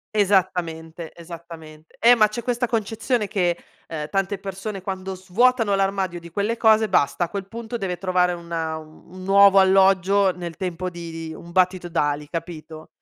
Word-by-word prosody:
Esattamente, 175 -5 0
esattamente. 165 -2 -12
Eh, 245 +1 +6
ma 215 -2 +5
c'è 225 +3 -6
questa 245 -1 -1
concezione 225 0 -1
che, 175 -3 0 0.3
ehm, 150 -2 -5
tante 195 +1 -1
persone 195 +1 -6
quando 190 0 -5
svuotano 215 +4 +2
l'armadio 195 -3 0
di 170 0 -12
quelle 205 +6 -1
cose, 220 -2 +4
basta, 175 0 +2
a 170 - -3
quel 195 -1 -5
punto 230 +2 -6
deve 180 -4 -3
trovare 180 0 +1
un 170 -1 -9
un 160 +2 -6
nuovo 195 0 +6
alloggio 190 0 +4
nel 175 -2 -7
tempo 185 -1 -3
di 170 -1 -8 0.2
di - - -7
un 170 +2 -11
battito 185 -1 +2
d'ali, 150 -3 -1
capito? 160 -1 -7
185 Hz, 160 wpm, -23 LUFS, 170-200 Hz, 0.3 s, Eh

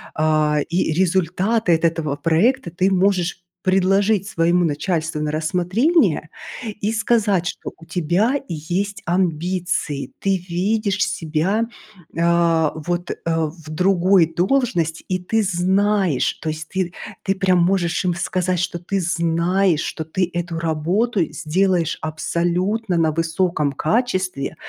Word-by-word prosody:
а, 155 -1 +2
и 170 -1 0
результаты 185 +3 +1
от 160 - -4
этого 160 -3 0
проекта 175 - +1
ты 185 +3 +1
можешь 185 -2 +1 0.2
предложить 195 +2 +2
своему 170 -1 +2
начальству 155 0 -1
на 150 - -1
рассмотрение 180 - +1 0.5
и 210 +2 0
сказать, 215 -5 +1
что - - -5
у 165 - -15
тебя 180 - +1
есть 185 +5 -3
амбиции, 175 -4 -1
ты 195 -1 +1
видишь 200 +2 0
себя, 175 +8 -1 0.5
а, 170 -2 +3
вот, 175 +3 -3
э, - - -3
в 165 -1 -2
другой 185 +2 +3
должности. 175 - 0
И 185 -1 0
ты 220 +5 0
знаешь, 190 -3 +1
то 160 - -2
есть 155 0 -5
ты 185 -2 -2 0.3
ты 195 - 0
прям 185 -2 +2
можешь 175 -2 +1
им 175 - +1
сказать, 180 0 -1
что 175 -1 -2
ты 195 +3 -2
знаешь, 170 0 +1
что 160 - -4
ты 180 +3 -1
эту 175 -1 -3
работу 175 +7 0
сделаешь 175 +1 0
абсолютно 175 +6 -1
на 160 -1 +2
высоком 165 -2 0
качестве. 185 - -1
175 Hz, 125 wpm, -21 LUFS, 165-195 Hz, 0.5 s, а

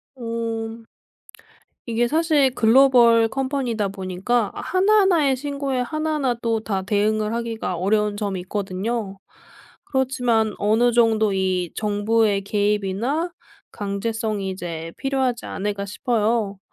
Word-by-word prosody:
어. 230 -1 -4 1.0
이게 235 +1 +1
사실 305 -4 +2
글로벌 235 -1 +5
컴퍼니다 260 -5 -1
보니까 195 +4 -1
하나하나의 370 -7 +3
신고에 280 -1 -3
하나하나 305 0 -1
또 230 -1 0
다 200 -3 -2
대응을 210 +2 0
하기가 230 -5 -3
어려운 210 +3 +1
점이 200 -3 -3
있거든요. 195 +2 -3 0.7
그렇지만 245 -5 +1
어느 225 +4 +3
정도 220 -3 +3
이 185 -2 -1
정부의 210 0 +1
개입이나 210 - -1 0.4
강제성이 205 0 -3
이제 165 -3 -6
필요하지 265 -3 -1
않을까 200 0 -3
싶어요. 215 -2 -1
225 Hz, 275 characters per minute, -22 LUFS, 205-250 Hz, 1.0 s, 글로벌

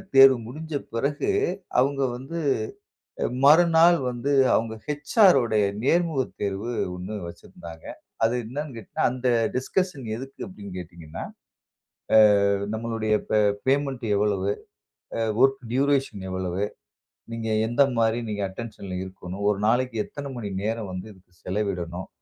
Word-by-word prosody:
தேர்வு 135 -1 +9
முடிஞ்ச 155 +4 -6 0.2
பிறகு, 145 - 0 0.5
அவுங்க 140 +1 +2
வந்து 135 +7 -7 0.9
அ - - +2 0.2
மறுநாள் 165 +2 +6
வந்து, 125 +4 -2 0.2
அவுங்க 110 0 -1 0.3
HR 205 -6 +6
உடைய 110 -3 +2 0.2
நேர்முக 165 -2 +2 0.2
தேர்வு 100 +3 -2 0.3
1 95 +4 -6
வச்சுருந்தாங்க. 85 -1 -11 0.4
அது 115 +2 +3
என்னானு 140 +3 -5
கேட்டீங்கனா, 110 - -2
அந்த 130 0 -2 0.3
டிஸ்கஷன் 145 +1 -1
எதுக்கு 135 +3 -9
அப்படினு 100 - -10
கேட்டீங்கன்னா. 85 -2 -8 1.2
அ, - - +3 0.3
நம்மளுடைய 110 -1 -1 0.2
பே, 110 - +4 0.3
பேமெண்ட் 135 -3 +1
எவ்வளவு? 100 -1 +1 0.7
அ, - - -1 0.2
வொர்க் 135 0 +4
டியூரேஷன் 135 -7 +1
எவ்வளவு? 95 +1 -2 0.7
நீங்க 115 -1 -4 0.2
எந்த 120 +4 +4 0.2
மாரி 115 +1 +2
நீங்க 105 -1 -3
அட்டென்ஷன்ல 100 -3 -7
இருக்கணும். 95 +1 -7
ஒரு 100 - 0
நாளைக்கு 125 0 +1
எத்தனை 140 -1 -7
மணி 110 -4 -4
நேரம் 110 -2 -2
வந்து 90 +3 -6
இதுக்கு 95 -2 -23
செலவிடணும். 90 -3 -3
115 Hz, 125 wpm, -25 LUFS, 100-135 Hz, 1.2 s, தேர்வு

